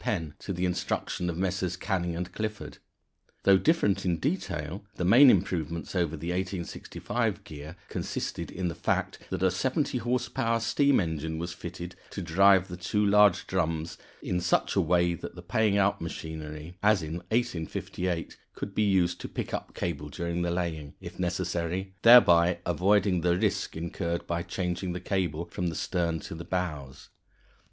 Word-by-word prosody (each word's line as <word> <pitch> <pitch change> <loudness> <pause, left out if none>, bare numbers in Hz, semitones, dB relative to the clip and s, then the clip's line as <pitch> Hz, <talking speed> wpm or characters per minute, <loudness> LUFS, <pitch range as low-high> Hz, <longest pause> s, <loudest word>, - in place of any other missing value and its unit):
Penn 80 -7 -2
to - - -5
the 90 0 -1
instructions 90 0 -1
of 85 - -3
Messrs. 90 -1 -1
Canning 90 -3 -1
& - - -28
Clifford. 110 +1 -5 0.6
Though 95 -1 +6
different 155 - +2
in 90 -3 +1
detail, 95 - -3
the 90 - -2
main 125 +9 +8
improvement 85 -5 0
over 85 -3 0
the 85 +4 -4
1865 90 -1 -3
gear 75 +2 -9
consisted - - -4
in 90 0 -3
the 85 - -2
fact - - -1
that - - -2
a 95 - +4
70 130 - 0
horse 125 +1 0
power 115 0 0
steam 140 +5 +3
engine 80 -3 -2
was 85 +2 -4
fitted 85 0 -7
to 100 - -5
drive 95 +3 +5
the 90 - -7
two 105 +3 0
large 105 -2 +5
drums 80 -3 -2 0.2
in 90 0 -1
such 85 - +1
a - - +4
way 85 +1 +2
that 85 - -7
the 90 - -10
paying 105 +1 +2
out 100 0 +2
machinery, 80 0 -6
as 105 -4 +4
in 80 +2 -4
1858, 90 -5 -2 0.2
could 100 - -5
be - - +1
used 95 -4 +2
to - - -6
pick - - -5
up - - -4
cable 75 -4 -3
during 85 +3 -3
the 85 - 0
laying, 85 -5 -3
if - - -10
necessary, 90 +1 -2
thereby 90 -8 +7
avoiding 95 +1 +2
the 90 +1 +2
risk - - -1
incurred 85 +1 -3
by 85 0 -1
changing 90 0 -3
the 90 - -4
cable 90 -4 -1
from 90 +1 -3
the 85 - -3
stern 85 -2 -1
to - - -8
the 80 +1 -6
bows. 75 -8 -4
90 Hz, 170 wpm, -28 LUFS, 85-100 Hz, 0.6 s, main